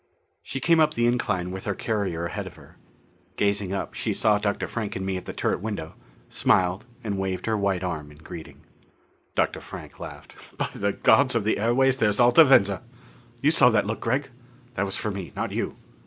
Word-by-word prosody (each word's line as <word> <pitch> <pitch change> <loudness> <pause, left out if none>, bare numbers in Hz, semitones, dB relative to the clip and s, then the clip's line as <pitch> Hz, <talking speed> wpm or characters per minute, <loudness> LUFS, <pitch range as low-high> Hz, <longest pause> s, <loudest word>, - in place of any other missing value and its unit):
She 135 - -5
came 165 +4 +4
up 155 -1 +3
the 120 - +2
incline 100 -7 0
with 95 0 -7
the 105 - -1
carrier 95 -7 -2
ahead 85 - -4
of - - -11
her. - - -17 0.6
Gazing 100 -2 0
up, 100 - -3
she - - -2
saw 105 -1 +3
Dr. 100 -1 -1
Frank 110 -3 -4
and 95 - -3
me 95 -1 -1
at 90 - -5
the - - -5
turret - - -1
window, 100 -7 -4 0.3
smiled 95 +4 +1 0.2
and 100 -3 -2
waved 95 -1 -2
her 110 - +1
white 100 -3 0
arm 75 -5 -4
in 75 - -16
greeting. 80 +1 -10 0.7
Dr. - - 0
Frank - - -10
laughed. - - -11
"By - - -1
the 100 0 -1
gods 125 +3 +4
of 115 - +2
the 105 -1 +1
airways, 130 +4 +3
there's 105 -1 +2
Alta 120 +6 +8
Venza! 100 - +4 0.6
You 150 - +5
saw 135 -6 +6
that 110 -4 +2
look, 110 +2 -3
Gregg? 130 +4 -1 0.4
That 100 - 0
was 95 - -4
for 105 - -2
me, 95 -3 -6
not - - -2
you." - - -2
105 Hz, 200 wpm, -25 LUFS, 95-120 Hz, 0.7 s, Alta